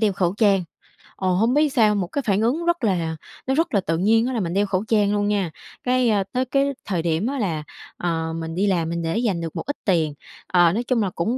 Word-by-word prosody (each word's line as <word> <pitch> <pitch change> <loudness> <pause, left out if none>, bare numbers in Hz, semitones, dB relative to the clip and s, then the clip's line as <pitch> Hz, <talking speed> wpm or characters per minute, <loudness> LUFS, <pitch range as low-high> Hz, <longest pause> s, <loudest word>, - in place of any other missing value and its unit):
đeo 215 -3 +3
khẩu 185 -1 0
trang. 200 -5 +3 0.5
Ồ, 185 -1 0
hổng 225 +7 +2
biết 300 +1 +3
sao, 215 -4 +4
một 190 -3 -1
cái 285 +10 -2
phản 200 +1 +2
ứng 280 +10 0
rất 345 -6 +1
là 170 -6 0 0.3
nó 265 - +1
rất 325 +2 0
là 200 - +4
tự 165 -1 -1
nhiên 225 +6 +3
á 260 - -2
là 230 - -1
mình 175 -3 -2
đeo 200 +1 +2
khẩu 190 0 -1
trang 210 -2 +2
luôn 205 0 +1
nha. 200 -5 0 0.3
Cái, 250 -1 +2
ờ, 205 -2 +2
tới 255 +1 0
cái 275 +2 +1
thời 180 -5 -1
điểm 165 +6 0
á 275 0 -2
là, 165 -7 -1 0.3
ờ, 165 -2 -2
mình 165 0 -5
đi 200 +3 +1
làm 170 -4 +1
mình 170 0 -2
để 165 +5 -1
dành 210 -8 0
được 165 -2 -5
một - - -3
ít 285 - -2
tiền, 165 -6 +2 0.3
ờ, 175 -2 +4
nói 235 +4 -1
chung 245 -2 +1
là 190 - 0
cũng 225 +10 -1
200 Hz, 265 wpm, -23 LUFS, 170-235 Hz, 0.5 s, sao